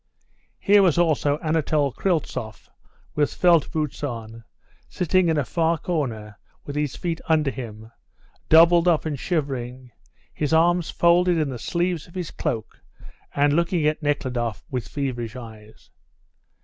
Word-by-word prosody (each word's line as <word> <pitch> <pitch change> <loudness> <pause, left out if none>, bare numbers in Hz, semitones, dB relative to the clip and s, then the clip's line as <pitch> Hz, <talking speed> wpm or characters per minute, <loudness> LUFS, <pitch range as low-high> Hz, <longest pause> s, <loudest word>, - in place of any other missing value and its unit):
Here 205 +1 +4
was 180 -5 +3
also 150 -4 +2
Anatole 155 -3 +1
Kryltzoff 150 - -3 0.4
with 145 -1 +1
felt 170 -3 +3
boots 150 -3 -3
on, 115 -4 -6 0.5
sitting 180 0 +1
in 160 - +1
a 145 - 0
far 165 +2 +1
corner 120 - -4 0.3
with 145 - -6
his 150 -2 -1
feet 170 -2 -3
under 155 -3 +3
him, 110 -3 -9 0.6
doubled 170 +2 +6
up 165 -3 +3
and 150 -4 -3
shivering, 130 -6 -3 0.4
his 150 +1 -2
arms 170 +1 +3
folded 175 +1 +3
in 155 -3 0
the 125 -3 -6
sleeves 175 +3 -2
of 170 - -18
his 180 -4 -4
cloak, 120 -9 -4 0.5
and 145 0 +3
looking 170 0 +1
at 155 +1 +1
Nekhludoff 125 -7 -2
with 125 -4 -3
feverish 125 -5 -4
eyes. 110 -3 -12
150 Hz, 140 wpm, -23 LUFS, 125-170 Hz, 0.6 s, doubled